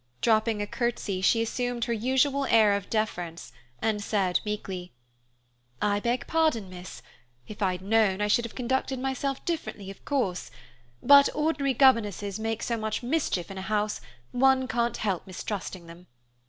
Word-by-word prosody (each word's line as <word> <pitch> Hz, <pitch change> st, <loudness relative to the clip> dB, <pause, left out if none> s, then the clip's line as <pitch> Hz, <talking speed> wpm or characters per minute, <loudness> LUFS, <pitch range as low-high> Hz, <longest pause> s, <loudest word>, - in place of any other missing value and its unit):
Dropping 220 Hz, -1 st, +2 dB
a -, -, -2 dB
curtsy, 210 Hz, -4 st, -2 dB
she 225 Hz, +4 st, +3 dB
assumed 245 Hz, 0 st, -2 dB
her 235 Hz, -, -1 dB
usual 265 Hz, +4 st, +1 dB
air 220 Hz, -5 st, +5 dB
of 200 Hz, -1 st, -3 dB
deference, 175 Hz, -7 st, -3 dB, 0.3 s
and 215 Hz, -2 st, 0 dB
said, 195 Hz, -4 st, +1 dB
meekly, 190 Hz, -4 st, -5 dB, 0.9 s
"I 205 Hz, 0 st, +1 dB
beg 240 Hz, +3 st, -1 dB
pardon, 310 Hz, -, +1 dB
miss. 180 Hz, 0 st, -10 dB, 0.4 s
If 210 Hz, -, -10 dB
I'd 185 Hz, -2 st, 0 dB
known, 205 Hz, -2 st, +2 dB
I 210 Hz, -, +1 dB
should 220 Hz, +3 st, +3 dB
have 235 Hz, -, -9 dB
conducted 265 Hz, +1 st, -1 dB
myself 270 Hz, +1 st, -3 dB
differently, 220 Hz, -, -4 dB
of 195 Hz, -, -15 dB
course, 220 Hz, -11 st, -1 dB, 0.5 s
but 280 Hz, +1 st, +8 dB
ordinary 300 Hz, -3 st, 0 dB
governesses 210 Hz, -6 st, +3 dB
make 225 Hz, 0 st, -2 dB
so 235 Hz, -, -1 dB
much 220 Hz, +2 st, -3 dB
mischief 240 Hz, -, -1 dB
in 190 Hz, -, -6 dB
a -, -, -5 dB
house, 210 Hz, +1 st, -1 dB, 0.3 s
one 260 Hz, +1 st, +3 dB
can't 235 Hz, -1 st, 0 dB
help 195 Hz, -5 st, -2 dB
mistrusting 185 Hz, -1 st, -5 dB
them. 170 Hz, +2 st, -13 dB
220 Hz, 155 wpm, -27 LUFS, 195-255 Hz, 0.9 s, but